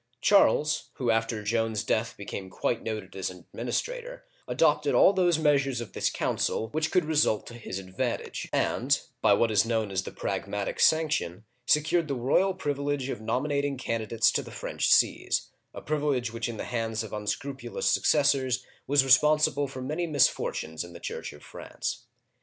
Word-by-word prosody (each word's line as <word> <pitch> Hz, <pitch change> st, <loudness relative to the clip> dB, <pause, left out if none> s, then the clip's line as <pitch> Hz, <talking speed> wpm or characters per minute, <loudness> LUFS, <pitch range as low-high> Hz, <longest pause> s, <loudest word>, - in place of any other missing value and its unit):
Charles, 150 Hz, -6 st, +3 dB
who 125 Hz, -3 st, 0 dB
after 115 Hz, -1 st, -1 dB
Joan's 115 Hz, 0 st, 0 dB
death 115 Hz, +2 st, -1 dB
became 100 Hz, -1 st, -6 dB
quite 115 Hz, +4 st, -2 dB
noted 110 Hz, -4 st, -5 dB
as 95 Hz, -1 st, -2 dB
an 90 Hz, -2 st, -12 dB
administrator, -, -, -4 dB, 0.2 s
adopted -, -, +2 dB
all 195 Hz, -, +6 dB
those 175 Hz, -4 st, +3 dB
measures 140 Hz, -4 st, +2 dB
of 115 Hz, -4 st, -7 dB
this -, -, 0 dB
council 110 Hz, -, -1 dB
which 155 Hz, +4 st, -1 dB
could 180 Hz, -2 st, +2 dB
result 150 Hz, -8 st, +2 dB
to -, -, -10 dB
his 110 Hz, -5 st, -6 dB
advan 95 Hz, +6 st, -2 dB
tage, -, -, -7 dB
and, -, -, +1 dB, 0.2 s
by -, -, +5 dB
what 115 Hz, -1 st, +2 dB
is 105 Hz, -2 st, +4 dB
known 110 Hz, -3 st, -1 dB
as 95 Hz, -1 st, 0 dB
the -, -, -8 dB
Pragmatic 100 Hz, -1 st, -3 dB
Sanction, 150 Hz, -, +2 dB, 0.2 s
secured 155 Hz, +2 st, +2 dB
the 140 Hz, -, -2 dB
royal 160 Hz, +10 st, +2 dB
privilege 145 Hz, -4 st, -2 dB
of 110 Hz, -, -4 dB
nominating 140 Hz, +4 st, -1 dB
candidates 115 Hz, -2 st, +1 dB
to -, -, 0 dB
the -, -, -10 dB
French -, -, -2 dB
sees, -, -, +2 dB, 0.2 s
a -, -, -9 dB
privilege 145 Hz, -6 st, -1 dB
which 115 Hz, 0 st, -3 dB
in 115 Hz, -, -6 dB
the -, -, -4 dB
hands 115 Hz, -2 st, -2 dB
of 110 Hz, -, -9 dB
unscrupulous 120 Hz, +4 st, -4 dB
successors 135 Hz, -4 st, +2 dB, 0.2 s
was 140 Hz, -1 st, +4 dB
responsible 145 Hz, +1 st, +4 dB
for 130 Hz, -1 st, -7 dB
many 155 Hz, +6 st, -2 dB
misfortunes 125 Hz, -, 0 dB
in 85 Hz, 0 st, -11 dB
the 85 Hz, -, -10 dB
Church -, -, -5 dB
of 75 Hz, -, -15 dB
France. -, -, -6 dB
125 Hz, 170 wpm, -27 LUFS, 110-150 Hz, 0.2 s, all